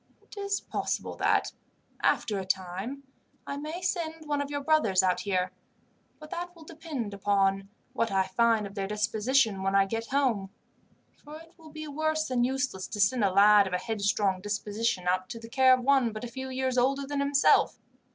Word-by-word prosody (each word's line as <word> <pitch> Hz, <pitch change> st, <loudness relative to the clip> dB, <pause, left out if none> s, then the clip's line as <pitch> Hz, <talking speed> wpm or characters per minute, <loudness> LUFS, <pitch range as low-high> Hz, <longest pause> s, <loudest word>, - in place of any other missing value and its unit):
"It -, -, -16 dB
is 400 Hz, 0 st, -2 dB
possible -, -, -3 dB
that, -, -, +1 dB, 0.5 s
after 240 Hz, -7 st, +1 dB
a -, -, -4 dB
time, 190 Hz, +8 st, -3 dB, 0.4 s
I 280 Hz, -, -4 dB
may 310 Hz, +5 st, -6 dB
send 325 Hz, -4 st, -3 dB
one 290 Hz, -1 st, 0 dB
of 285 Hz, -, -4 dB
your 285 Hz, 0 st, -3 dB
brothers 245 Hz, -12 st, +3 dB
out 185 Hz, -1 st, +2 dB
here, 185 Hz, -2 st, -1 dB, 0.7 s
but 305 Hz, -1 st, -12 dB
that 350 Hz, 0 st, -5 dB
will 330 Hz, -, -14 dB
depend 305 Hz, -9 st, -6 dB
upon 195 Hz, -1 st, +1 dB, 0.2 s
what 230 Hz, -, 0 dB
I 190 Hz, -1 st, +3 dB
find 225 Hz, +2 st, +2 dB
of 200 Hz, -, -8 dB
their 195 Hz, -1 st, -3 dB
disposition 210 Hz, +1 st, +1 dB
when 195 Hz, +1 st, 0 dB
I 195 Hz, 0 st, +5 dB
get 225 Hz, +3 st, -4 dB
home; 250 Hz, -8 st, 0 dB, 0.7 s
for 300 Hz, +1 st, -10 dB
it 330 Hz, +1 st, -17 dB
will 320 Hz, -1 st, -15 dB
be 310 Hz, 0 st, -8 dB
worse 315 Hz, +1 st, -1 dB
than 250 Hz, -2 st, +1 dB
useless 255 Hz, -7 st, -1 dB
to 210 Hz, -, -6 dB
send 220 Hz, +3 st, +3 dB
a 200 Hz, -, +4 dB
lad 205 Hz, +1 st, +6 dB
of 185 Hz, -, -6 dB
a -, -, +2 dB
headstrong 200 Hz, -2 st, 0 dB
disposition 205 Hz, -1 st, -2 dB
out 185 Hz, +1 st, 0 dB
to 230 Hz, -, -6 dB
the 225 Hz, -, -10 dB
care 260 Hz, +1 st, +5 dB
of 255 Hz, 0 st, +4 dB
one 265 Hz, -3 st, +3 dB
but 215 Hz, -, -7 dB
a -, -, -3 dB
few 260 Hz, +3 st, -7 dB
years 260 Hz, -1 st, 0 dB
older 275 Hz, +3 st, +1 dB
than 285 Hz, 0 st, -3 dB
himself. 280 Hz, 0 st, +3 dB
235 Hz, 195 wpm, -28 LUFS, 200-285 Hz, 0.7 s, lad